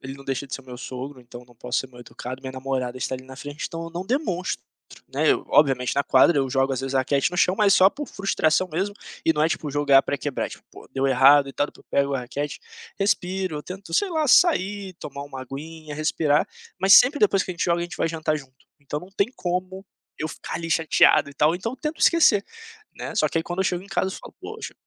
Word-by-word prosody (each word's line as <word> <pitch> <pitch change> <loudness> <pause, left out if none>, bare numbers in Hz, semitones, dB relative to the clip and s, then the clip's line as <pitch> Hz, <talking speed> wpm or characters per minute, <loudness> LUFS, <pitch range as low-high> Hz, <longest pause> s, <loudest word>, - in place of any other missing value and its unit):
ele 135 +1 -7
não 140 0 -13
deixa 135 +1 -3
de - - -6
ser - - -6
o - - -25
meu 125 -1 -9
sogro, 130 +2 -7
então 120 0 -12
não 120 - -20
posso 125 +1 -2
ser 130 - -7
mal 125 -1 -14
educado. 125 +2 -8
Minha 130 -1 -7
namorada 130 -1 -3
está 130 - -2
ali, 130 0 -8
na 130 0 -12
frente, 145 +1 -7
então 165 0 -6
eu 165 - -8
não 175 +3 -5
demonstro, 195 - -2 0.5
né. - - +2
Eu - - +1
obviamente 135 -4 +3
na 140 - +2
quadra, 135 +5 +4
eu 135 -1 +1
jogo 135 +1 +1
às 130 - -2
vezes 135 0 -4
a - - +4
raquete 140 +4 +1
no 180 - -5
chão, 185 0 +3
mas 205 -2 +5
só 185 - +7
por 295 -1 -6
frustração 185 -3 +1
mesmo, 195 +5 -1 0.3
e 160 - +4
não 150 0 0
é 160 - +4
tipo 150 -2 -3
jogar 140 -1 +4
pra 140 - -2
quebrar, 140 0 -3
é - - -9
tipo - - -12
pô, - - -14
deu 135 0 0
errado 135 +2 +6
e - - -8
tal, 145 - 0
depois - - -17
pego 140 0 +1
a 130 - -1
raquete, 145 +4 -5 0.4
respiro, 190 -3 0
eu 150 - -5
tento 190 +2 -9
sei 410 -2 +2
lá, 315 -2 0
sair, 200 - +3
tomar 140 -4 -8
uma 135 -2 -8
aguinha, 155 +3 -8
respirar. 155 -1 +1 0.3
Mas 190 +1 +7
sempre 270 +4 +3
depois 195 -2 +3
que - - -6
a 180 - -5
gente - - -1
joga 170 0 +1
a - - -1
gente 175 - -6
vai 165 - 0
jantar 155 -1 -1
junto, 135 -3 -12 0.3
então 145 +1 -5
não 180 +2 -13
tem 200 +4 0
como 185 +2 -3 0.3
eu 155 - -2
ficar - - -7
ali 165 0 -4
chateado 160 -3 +4
e 140 - -12
tal, 155 +4 +3
então 225 +8 -4
tento 300 +4 -4
esquecer, 270 -12 +5 0.5
né. - - -6
Só - - +2
que - - -1
aí 160 - 0
quando 175 +2 -5
eu - - +3
chego 180 -1 -1
em 200 - -14
casa 190 0 0
eu - - -4
falo: - - -13
"Poxa, - - -7
155 Hz, 260 wpm, -24 LUFS, 135-185 Hz, 0.5 s, só